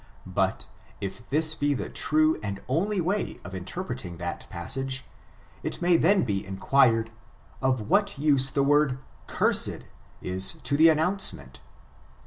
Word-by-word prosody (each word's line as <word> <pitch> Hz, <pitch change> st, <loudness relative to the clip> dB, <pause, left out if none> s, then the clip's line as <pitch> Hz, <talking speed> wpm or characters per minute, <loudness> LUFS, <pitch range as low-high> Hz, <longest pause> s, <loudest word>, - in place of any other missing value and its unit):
But, -, -, -1 dB, 0.3 s
if 100 Hz, +4 st, -7 dB
this 155 Hz, +2 st, +3 dB
be 145 Hz, -2 st, 0 dB
the -, -, -4 dB
true 155 Hz, +1 st, +1 dB
and 100 Hz, -2 st, -5 dB
on 165 Hz, +11 st, 0 dB
ly 210 Hz, -2 st, -1 dB
way 195 Hz, +5 st, -2 dB
of 90 Hz, -, -8 dB
interpreting 95 Hz, -, -6 dB
that 85 Hz, 0 st, -6 dB
passage, 135 Hz, -1 st, -4 dB, 0.6 s
it -, -, -4 dB
may 175 Hz, 0 st, +3 dB
then 185 Hz, +4 st, +3 dB
be 100 Hz, -4 st, -2 dB
inquired, 115 Hz, +3 st, +2 dB, 0.5 s
of 130 Hz, -3 st, +1 dB
what 200 Hz, 0 st, +1 dB
use 140 Hz, -2 st, +6 dB
the 140 Hz, +1 st, 0 dB
word 145 Hz, -2 st, +2 dB, 0.3 s
cursed -, -, +1 dB, 0.4 s
is 95 Hz, +1 st, -1 dB
to 140 Hz, -, 0 dB
the 160 Hz, +3 st, +6 dB
an 155 Hz, -, +3 dB
nouncement? 160 Hz, -, -2 dB
140 Hz, 145 wpm, -26 LUFS, 105-160 Hz, 0.6 s, use